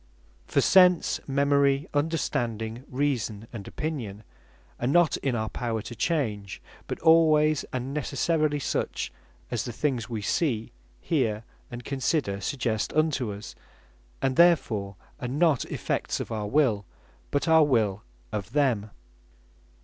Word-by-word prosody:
For - - +2
Sense, 180 -2 +5
Memory, 140 0 +2
Understanding, 120 -6 -1
Reason, 125 -6 -1
and 105 -4 -7
Opinion 120 -10 -4 0.6
are 120 - -1
not 165 +2 +4
in 135 -3 -1
our 110 -1 -2
power 115 -3 -3
to - - -7
change; 110 - -1 0.3
but - - -3
alwaies, 155 -2 +5
and 130 +2 -3
necessarily 150 +1 0
such, 140 - -2 0.4
as 120 -4 -1
the 120 - -5
things 125 -2 -2
we 110 -3 -4
see, 115 - 0 0.3
hear, 115 -8 0 0.3
and 120 0 -8
consider 135 -7 -1
suggest 115 0 -1
unto 145 -7 +1
us; 100 +1 -8 0.7
and 130 -1 +1
therefore 115 - +3 0.2
are 125 - -4
not 145 +1 +2
effects - - -2
of - - -5
our 105 -2 -2
Will, 120 -6 +2 0.5
but 145 +3 -1
our 160 -1 +6
Will 110 -8 +1 0.3
of 105 +2 -5
them. 125 -8 +1
130 Hz, 130 wpm, -27 LUFS, 110-150 Hz, 0.7 s, our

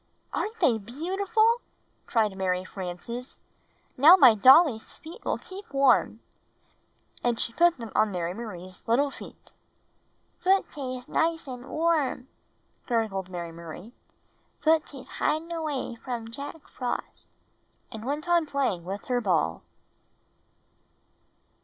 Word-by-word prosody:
"Aren't 435 +2 -3
they 250 - +3
beautiful?" 390 - +1 0.5
cried 215 -4 +1
Mary 185 -1 -1
Frances. 195 +8 -6 0.6
"Now 305 +8 +9
my 260 -10 +8
dolly's 255 - +6
feet 335 +8 -12
will - - -1
keep 385 -3 -11
warm." 270 -4 +3 1.0
And 240 -2 +1
she 230 - -1
put 345 +2 +4
them 230 -4 -8
on 215 - +3
Mary 175 -1 -2
Marie's 185 -4 -8
little 275 +5 +2
feet. - - -12 0.9
Footies 275 -9 0
nice 330 0 0
and 250 0 -8
warm," 310 -6 0 0.6
gurgled 215 -6 -1
Mary 170 -2 -5
Marie; 170 +7 -10 0.7
"footies 310 -4 0
hidin' 320 +3 0
away 310 -7 -3
from 230 -1 -6
Jack 285 +5 -8
Frost," 250 -2 -5 0.6
and 220 -2 -7
went 295 +6 -3
on 345 -2 +3
7ir£][l''{r - - -20
t/l - - -19
playing 255 -12 0
with 195 +3 -5
her 245 -1 0
ball. 165 - +1
250 Hz, 120 wpm, -27 LUFS, 215-315 Hz, 1.0 s, Now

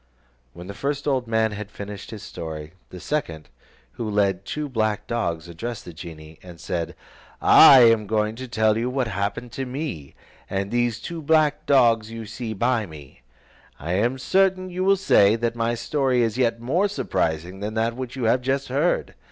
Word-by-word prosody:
When 85 +1 -10
the 100 - -7
first 140 +5 -3
old 130 -4 0
man 110 -1 +1
had 105 0 -6
finished 100 -1 -8
his 110 -3 -8
story, 80 -1 -7 0.2
the 90 - -9
second, 85 - -3 0.4
who 110 - -5
led 100 -2 +2
the 100 - -14
two 150 -1 -3
black 110 -5 -1
dogs, 85 -9 -2
addressed 105 +7 -6
the 85 - -9
genie, 80 -2 -11
and 90 -2 -12
said: 85 -1 -4 0.4
"I 130 - +8
am 115 -3 +5
going 110 0 0
to 130 +1 -6
tell 110 -2 +2
you 120 +2 -1
what 130 -1 -1
happened 100 +4 -3
to 135 +3 -4
me, 125 - -5 0.3
and 95 +1 -2
these 120 -1 0
two 165 +6 -6
black 155 -1 +2
dogs 115 -5 +4
you 115 0 -7
see 110 +1 -5
by 115 0 +1
me; 75 -6 -13 0.6
and 80 - -8
I - - +1
am 120 +7 +1
certain 185 +5 +1
you 180 +1 -2
will 195 +1 +4
say, 105 - +4
that 115 0 -2
my 115 0 0
story 130 0 +1
is 115 -1 -1
yet 115 -2 +1
more 165 - +1
surprising 85 - -2
than 105 +2 -4
that 115 +1 0
which 130 -1 -6
you 130 - -4
have 120 +3 +3
just 135 +2 -1
heard. 145 +7 0
115 Hz, 195 wpm, -23 LUFS, 100-130 Hz, 0.6 s, I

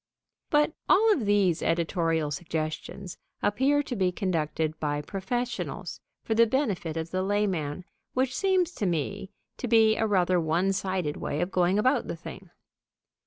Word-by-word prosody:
But 295 +1 +3 0.2
all 440 +1 +6
of 245 - -2
these 200 -5 +3
editorial 165 -2 0
suggestions 160 +4 -4 0.2
appear 275 +8 +2
to 255 - -4
be 185 -3 +1
conducted 160 -4 -1
by 145 -1 -1
professionals 235 +8 -4 0.2
for 225 - -1
the 230 +1 +5
benefit 205 - -1
of 160 +1 -4
the 185 - 0
layman, 185 -5 -1 0.3
which 255 0 +1
seems 375 -3 +2
to 205 - -2
me 180 +4 -2 0.3
to 250 - -4
be 220 -1 +5
a 220 - +1
rather 185 -3 +2
one 170 +5 +1
sided 185 -6 -2
way 145 - -3
of 175 +3 -1
going 180 +1 +2
about 255 +3 +2
the - - -3
thing. 180 +2 -10
190 Hz, 155 wpm, -27 LUFS, 165-225 Hz, 0.3 s, all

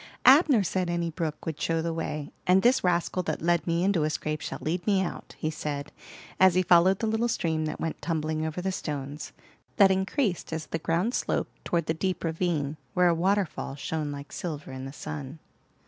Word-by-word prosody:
Abner 270 - +7
said 185 -1 -1
any 170 -1 -1
brook 160 -2 -4
would 160 -2 -4
show 165 0 +1
the 165 0 -1
way, 150 -3 -4 0.2
and 185 +1 +5
this 250 +3 +4
rascal 180 0 +1
that 155 -3 -2
led 170 0 +1
me 170 +1 +1
into 195 -3 +2
a 155 - +1
scrape 155 0 -3
shall - - -4
lead 175 +5 -2
me 200 -2 +4
out," 190 - -4
he 155 - -2
said, 145 -1 -4 0.5
as 190 -2 +6
he 185 - +4
followed 180 +2 +5
the 225 - -2
little 220 +2 +1
stream 160 -8 0
that 155 - -4
went 160 - -3
tumbling 155 -2 -1
over 160 +3 -3
the 190 - 0
stones, 145 -4 -5 0.5
that 200 -3 +7
increased 190 - 0
as 160 -1 -3
the 165 - -3
ground 170 +9 0
sloped - - -2
toward 170 -2 0
the 160 - 0
deep 185 +3 -2
ravine, 160 -3 -1 0.2
where 180 -1 +5
a - - +4
waterfall 185 -4 0
shone 150 +1 -3
like 140 0 -8
silver 150 -5 -5
in 130 0 -6
the 135 - -6
sun. 145 0 -6
165 Hz, 205 wpm, -27 LUFS, 155-185 Hz, 0.5 s, Abner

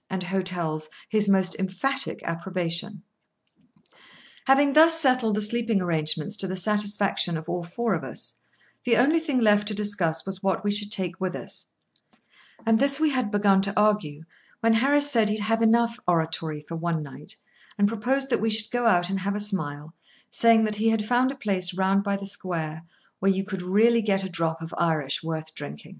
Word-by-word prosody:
and 190 -1 -3
hotels 175 -4 -3 0.2
his 210 -2 +1
most 190 -1 +3
emphatic 260 +9 -1
approbation. 175 +2 -3 1.4
Having 275 +1 +4
thus 325 +2 +7
settled 255 -7 +3
the 215 - 0
sleeping 230 0 +1
arrangements 160 +2 +1
to 195 - 0
the 185 - -4
satisfaction 205 -3 +1
of 160 +1 -9
all 175 0 -3
four 225 +7 -2
of - - -3
us, - - -6 0.5
the 235 -2 +2
only 295 +7 +3
thing 295 -5 -1
left 210 -2 +3
to 215 - -1
discuss 195 -6 0
was 190 -1 -4
what 195 +1 -1
we 205 - 0
should 205 0 -1
take 185 -5 -3
with 185 -1 -2
us; - - -2 1.0
and 225 -1 +3
this 275 +1 +2
we 310 -1 +2
had 255 -5 -1
begun 200 -2 +3
to 200 +1 0
argue, 205 -8 0 0.4
when 230 0 +3
Harris 285 +5 +3
said 225 -5 +2
he'd 215 +1 -1
had 225 +2 0
enough 230 +1 +2
oratory 160 -2 -1
for 165 - -6
one 165 -1 -2
night, 145 +1 -8 0.4
and 205 0 +3
proposed 260 +5 -1
that - - +1
we 225 - +1
should 215 0 +2
go 245 -1 0
out 180 -3 +2
and 195 - -1
have 200 +2 -2
a - - -2
smile, 155 -7 -2 0.4
saying 230 -1 +4
that 215 -1 -1
he 225 +2 +2
had 225 -1 0
found 250 +3 +2
a - - -8
place, 185 -7 -1
round 195 +1 +1
by 200 -1 -1
the 195 - -8
square, 165 -5 -4 0.4
where 195 +1 +2
you 190 0 -1
could 190 -2 -5
really 220 +6 +3
get 195 -3 0
a 190 - -4
drop 165 -2 -2
of 165 - -8
Irish 155 -5 0
worth 160 -1 -5
drinking. 75 - -9
200 Hz, 190 wpm, -25 LUFS, 175-225 Hz, 1.4 s, thus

